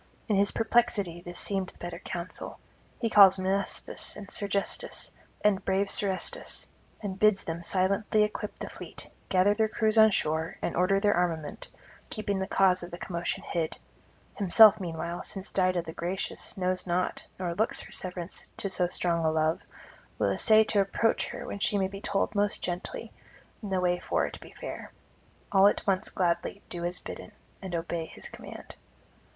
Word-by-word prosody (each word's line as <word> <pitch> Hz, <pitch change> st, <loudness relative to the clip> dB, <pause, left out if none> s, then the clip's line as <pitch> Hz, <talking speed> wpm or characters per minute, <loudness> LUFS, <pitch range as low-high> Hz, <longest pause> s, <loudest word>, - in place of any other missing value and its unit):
In 215 Hz, -, +2 dB
his 200 Hz, +1 st, +4 dB
perplexity 220 Hz, -7 st, +1 dB
this 175 Hz, 0 st, -7 dB
seemed 195 Hz, -2 st, +1 dB
the -, -, -19 dB
better 175 Hz, -1 st, -6 dB
counsel; 175 Hz, 0 st, -4 dB, 0.4 s
he 230 Hz, -, 0 dB
calls 195 Hz, -3 st, +7 dB
Mnestheus 190 Hz, +1 st, -1 dB
and 205 Hz, -1 st, -9 dB
Sergestus, 200 Hz, -1 st, -1 dB, 0.3 s
and 210 Hz, -2 st, +3 dB
brave 195 Hz, +1 st, +1 dB
Serestus, 205 Hz, -, 0 dB, 0.3 s
and 195 Hz, -2 st, -4 dB
bids 215 Hz, -2 st, +4 dB
them 165 Hz, +1 st, -4 dB
silently 200 Hz, +4 st, +2 dB
equip 210 Hz, 0 st, -4 dB
the -, -, -6 dB
fleet, -, -, -10 dB, 0.2 s
gather 190 Hz, +2 st, +4 dB
their 220 Hz, +1 st, +1 dB
crews 220 Hz, 0 st, +2 dB
on 220 Hz, 0 st, +8 dB
shore, 160 Hz, -4 st, -1 dB
and -, -, -3 dB
order 185 Hz, +2 st, +3 dB
their 205 Hz, 0 st, +3 dB
armament, 165 Hz, -4 st, -1 dB, 0.4 s
keeping 205 Hz, -2 st, -2 dB
the 190 Hz, -, -2 dB
cause 185 Hz, -1 st, +3 dB
of 175 Hz, -, -7 dB
the 175 Hz, -, -7 dB
commotion 175 Hz, -1 st, -3 dB
hid; 165 Hz, -2 st, -2 dB, 0.6 s
himself 205 Hz, +2 st, +7 dB
meanwhile, 170 Hz, -1 st, -4 dB
since 195 Hz, +1 st, -4 dB
Dido 185 Hz, -2 st, +2 dB
the 160 Hz, -, -8 dB
gracious 180 Hz, +4 st, -3 dB
knows 185 Hz, 0 st, 0 dB
not 180 Hz, +1 st, -1 dB
nor 180 Hz, -2 st, -2 dB
looks 220 Hz, +6 st, 0 dB
for -, -, -9 dB
severance 180 Hz, -1 st, -3 dB
to 195 Hz, -, -2 dB
so 180 Hz, -1 st, +2 dB
strong 170 Hz, -1 st, +1 dB
a 160 Hz, -, +3 dB
love, 155 Hz, +1 st, +1 dB, 0.6 s
will 100 Hz, -2 st, +1 dB
essay 215 Hz, -, +6 dB
to 210 Hz, -2 st, +2 dB
approach 210 Hz, +3 st, +1 dB
her -, -, -7 dB
when 200 Hz, -, -6 dB
she 205 Hz, -, +5 dB
may 190 Hz, -1 st, +1 dB
be 195 Hz, +1 st, -9 dB
told 200 Hz, 0 st, 0 dB
most 205 Hz, 0 st, 0 dB
gently, 180 Hz, -, -4 dB, 0.5 s
and 205 Hz, -3 st, -6 dB
the 190 Hz, -, +1 dB
way 180 Hz, -1 st, +1 dB
for -, -, 0 dB
it -, -, -7 dB
be -, -, -13 dB
fair. -, -, -8 dB, 0.6 s
All 195 Hz, 0 st, +6 dB
at -, -, 0 dB
once 190 Hz, -2 st, +1 dB
gladly 175 Hz, +2 st, -1 dB
do 170 Hz, -1 st, -5 dB
as 175 Hz, +1 st, 0 dB
bidden, -, -, -8 dB, 0.3 s
and 185 Hz, -3 st, -5 dB
obey 165 Hz, 0 st, -3 dB
his -, -, -9 dB
command. -, -, -10 dB
190 Hz, 175 wpm, -28 LUFS, 175-205 Hz, 0.6 s, on